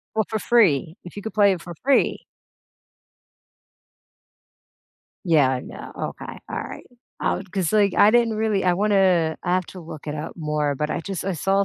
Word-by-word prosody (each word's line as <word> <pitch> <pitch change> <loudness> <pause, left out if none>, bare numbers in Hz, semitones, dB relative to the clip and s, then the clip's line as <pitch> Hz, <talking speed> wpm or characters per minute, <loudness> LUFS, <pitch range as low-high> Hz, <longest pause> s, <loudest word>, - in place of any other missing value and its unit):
Well, 220 - +1
for 220 - -2
free, 175 - +2
if 175 - -10
you 205 - -6
could 220 - -6
play 200 -2 +4
it 175 - -6
for 175 - -8
free. 275 - +2 3.0
Yeah, 155 -6 +4
I 130 -1 -1
know, - - -10 0.3
okay, - - -8
all - - -3
right, - - -9 0.3
I - - 0
wa 185 - -6
'cause, 185 -2 -1
like, 205 -3 +3
I 210 - +7
didn't 235 -1 +3
really, 215 -3 0
I 180 -1 +3
wanna 185 -5 +2
I 180 0 0
have 185 - +1
to 185 - -10
look 155 -2 -10
it 150 - -3
up 155 +2 -5
more, 150 -2 -1
but, 150 +2 -2
I - - -2
just 185 +1 -5
I 195 - -1
saw 195 +4 +1
185 Hz, 190 wpm, -23 LUFS, 160-205 Hz, 3.0 s, I